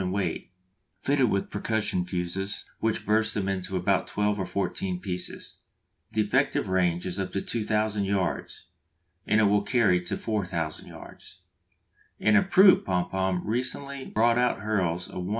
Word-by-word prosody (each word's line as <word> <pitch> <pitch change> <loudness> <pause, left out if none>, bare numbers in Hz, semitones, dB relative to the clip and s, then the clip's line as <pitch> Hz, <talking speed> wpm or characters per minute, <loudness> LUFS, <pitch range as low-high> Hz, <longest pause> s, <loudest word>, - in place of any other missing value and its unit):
in 90 -1 -2
weight, 95 -4 -2 0.5
fitted 135 -4 +2
with 100 - -1
percussion 105 -3 0
fuses 90 +2 -3
which 110 -1 -1
burst 110 +1 +2
them 95 -2 -1
into 95 -1 -3
about - - +1
twelve 105 0 0
or 95 - -2
fourteen 95 -2 -2
pieces. 90 -2 -6 0.5
The 110 - +1
effective 130 +3 +1
range 90 -2 +1
is 90 +1 -3
up 95 - -3
to 100 - -1
2000 105 -2 -1
yards, 95 -3 -2 0.6
and 110 - +3
it - - +4
will 105 0 +4
carry 100 -4 +2
to 85 - -3
4000 90 -7 -3
yards. - - -12 0.8
An 110 0 +3
improved 190 - +6
Pom 90 -1 -1
pom 95 -1 0
recently 130 +4 -2
brought 115 +2 +2
out 125 -5 +1
hurls 90 -5 -1
a - - -7
1 - - -3
1/4 - - -5
lb. - - -4
100 Hz, 165 wpm, -27 LUFS, 90-110 Hz, 0.8 s, improved